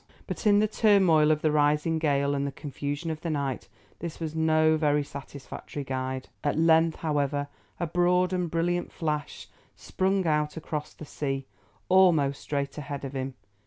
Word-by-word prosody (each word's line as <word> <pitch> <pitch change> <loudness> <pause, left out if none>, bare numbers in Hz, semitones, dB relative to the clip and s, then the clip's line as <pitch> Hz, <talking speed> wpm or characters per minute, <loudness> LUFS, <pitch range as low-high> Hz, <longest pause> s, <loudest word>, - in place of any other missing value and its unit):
But - - -3
in 205 -1 +6
the 215 +1 +3
turmoil 190 -8 +4
of 155 -1 +1
the 155 - +3
rising 150 +2 +2
gale 140 -2 +1
and 140 0 -1
the - - -3
confusion 145 +3 -4
of 155 0 -6
the 170 - -3
night, 140 -6 -2 0.3
this 170 -1 -6
was 160 -2 -4
no 160 0 +3
very 150 -2 +2
satisfactory 140 +1 -8
guide. 130 0 -3 0.2
At 145 - 0
length, 160 0 +4
however, 145 -1 0 0.3
a - - 0
broad 180 +2 +2
and 180 -2 -1
brilliant 175 +2 -1
flash 150 -3 -3 0.3
sprung 190 0 0
out 150 -1 0
across 150 -1 -5
the 155 - -9
sea, 135 -2 -3 0.4
almost 165 -7 +4
straight 140 0 -3
ahead 140 -1 -5
of 135 - -6
him. 135 -1 -4
150 Hz, 165 wpm, -27 LUFS, 140-165 Hz, 0.4 s, in